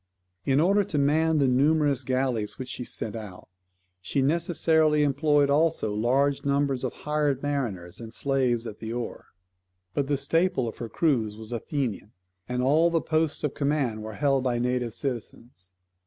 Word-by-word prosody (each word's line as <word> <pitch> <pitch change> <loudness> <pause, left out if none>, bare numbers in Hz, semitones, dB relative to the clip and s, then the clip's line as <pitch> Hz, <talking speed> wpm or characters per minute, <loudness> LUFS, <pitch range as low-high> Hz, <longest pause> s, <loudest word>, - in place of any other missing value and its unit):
In 135 0 +3
order 200 +5 +4
to 165 - -3
man 155 +3 +3
the 140 -2 +3
numerous 140 +1 +2
galleys 130 -4 -1
which 130 -1 -6
she 125 - -5
sent 110 -2 -4
out, 105 -5 -8 0.5
she 135 +9 0
necessarily 160 -1 +2
employed 145 0 +3
also 150 -7 +2
large 135 +6 +1
numbers 140 -2 0
of 130 - -1
hired 150 -2 -1
mariners 105 -11 -3
and 115 -1 -8
slaves 125 -3 0
at 105 -2 -7
the 110 0 -5
oar; 120 0 -5 0.7
but 140 -1 -1
the 145 0 +1
staple 165 -1 +1
of 110 - -7
her 115 - -5
crews 115 -7 0
was 110 +1 -9
Athenian, 120 -3 -3 0.4
and 125 0 -1
all 155 +6 +4
posts 155 -1 -1
of 150 - -1
command 140 -7 0
were 110 0 -6
held 135 -1 +1
by 125 -2 0
native 125 -1 -1
citizens. 120 -6 -6
135 Hz, 160 wpm, -26 LUFS, 120-150 Hz, 0.7 s, order